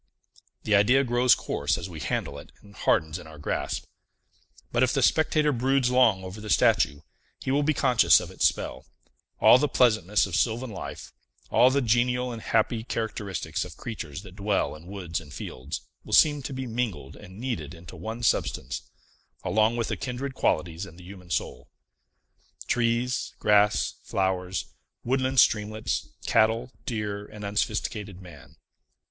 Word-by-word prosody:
The 105 - 0
idea 120 +7 +5
grows 125 0 +4
coarse - - -1
as - - -5
we 85 -4 -9
handle 85 - -3
it, - - -14
and 100 - -16
hardens 80 -3 +1
in 85 - -11
our 80 -1 -12
grasp. 75 - -3 0.9
But, 120 - +1
if 130 -1 +3
the 135 - +1
spectator 155 +1 +3
broods 130 0 +1
long 115 -7 +4
over 95 +3 -8
the 105 - -7
statue, 85 -10 +3 0.4
he 130 - -3
will 140 +2 +3
be 150 +1 +1
conscious 130 -4 +5
of - - -8
its - - +3
spell; - - -4 0.5
all 125 - +7
the 150 - +2
pleasantness 105 -7 +3
of 95 -4 -4
sylvan 115 +2 0
life, 95 - -8 0.4
all 125 - +6
the 140 +1 +1
genial 125 +2 +1
and 115 -1 -6
happy 110 +1 +1
characteristics 110 -6 -3
of - - -10
creatures 90 -7 -6
that 95 -2 -12
dwell 100 -4 0
in 80 +3 -13
woods 90 -4 -4
and 75 -3 -12
fields, 65 +4 -6 0.2
will - - -8
seem 150 -2 +5
to 140 - -6
be 130 0 -4
mingled 110 - -3
and 95 -1 -12
kneaded 90 - -4
into 85 0 -12
one 115 +2 -6
substance, 65 - 0 0.6
along 110 +2 +2
with 115 - -1
the - - -1
kindred 135 +1 -4
qualities 85 -5 -1
in 85 - -13
the 90 - -14
human 90 -1 -12
soul. - - -3 1.0
Trees, 120 +2 0
grass, 105 0 +3
flowers, 95 -1 -1 0.4
woodland 130 +1 +1
streamlets, 110 0 +1 0.2
cattle, 115 +3 +2 0.2
deer, 105 -3 -3
and 105 -1 -9
unsophisticated 105 -1 -2
man. 90 -2 -14
110 Hz, 160 wpm, -26 LUFS, 95-125 Hz, 1.0 s, all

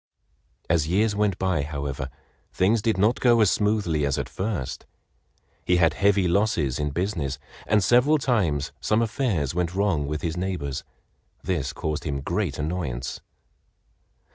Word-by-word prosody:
As 80 -2 +2
years 105 +5 +2
went 105 -3 +1
by, 95 -4 0
however, 70 -2 -4 0.4
things 105 +4 +2
did 110 -2 +1
not 105 +5 +2
go 120 -2 +4
as 105 -4 +5
smoothly 105 -8 +1
as 70 -2 0
at - - -2
first. 95 - -4 0.8
He 90 - +2
had 85 -3 +4
heavy 100 -1 +3
losses 85 - +1
in 75 0 0
business, 80 -4 -2 0.3
and 105 -2 +3
several 125 +9 +4
times 95 - 0
some 110 +2 +2
affairs 105 - -1
went 90 0 -1
wrong 95 -8 +1
with 75 +1 -3
his 85 -1 -1
neighbors. 90 -7 -3 0.6
This 85 -7 -1
caused 75 -1 -3
him 70 -3 -3
great 85 0 -2
annoyance. 75 -6 -3
90 Hz, 145 wpm, -25 LUFS, 75-105 Hz, 0.8 s, as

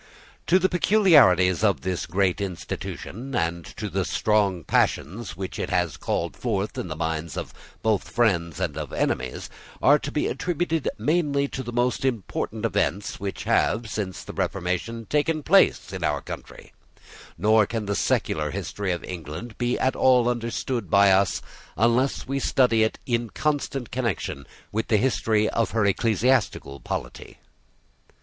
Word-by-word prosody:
To 180 - +5
the 190 0 +3
peculiarities 145 - +5
of 100 -3 +2
this 90 -1 -2
great 95 +2 +1
institution, 100 +6 -5
and 85 +1 -1
to - - -3
the - - -1
strong 100 -5 +1
passions 95 +10 0
which 95 0 -5
it - - -2
has 90 -4 0
called - - -2
forth 105 -4 -2
in - - -4
the 80 - -5
minds 80 0 -3 0.5
both 110 -4 +2
of - - -14
friends 85 -9 +1
and - - -2
of - - -5
enemies, 65 -1 -2 0.3
are 145 +2 +5
to 140 - -5
be 150 - 0
attributed 165 -3 -1
many 140 +3 +1
of 135 -2 -5
the 120 - -5
most 120 +2 0
important 120 -7 -2
events 100 +5 -1
which 100 0 -4
have, 115 +1 +1
since 95 -4 -4
the - - -8
Reformation, 100 +5 -2
taken 150 +3 0
place 195 +6 +4
in - - -4
our - - 0
country; - - -10 0.6
nor 110 0 +4
can 115 -2 -3
the 100 - -1
secular 75 -5 0
history 95 +6 -3
of 85 - -3
England 90 - -7
be 120 0 0
at 130 - +1
all 125 -2 +4
understood 120 -2 -2
by 100 +1 +6
us, 95 0 +2 0.3
unless 120 +6 +2
we 135 +1 -1
study 125 -4 +3
it 110 - +1
in 120 -2 -1
constant 140 -4 -2
connection 115 - -3 0.2
with 110 +2 -2
the 110 - +3
history 110 -2 +2
of 115 - 0
her 105 - +3
ecclesiastical 110 - +1
polity. - - -6
110 Hz, 155 wpm, -25 LUFS, 95-130 Hz, 0.6 s, by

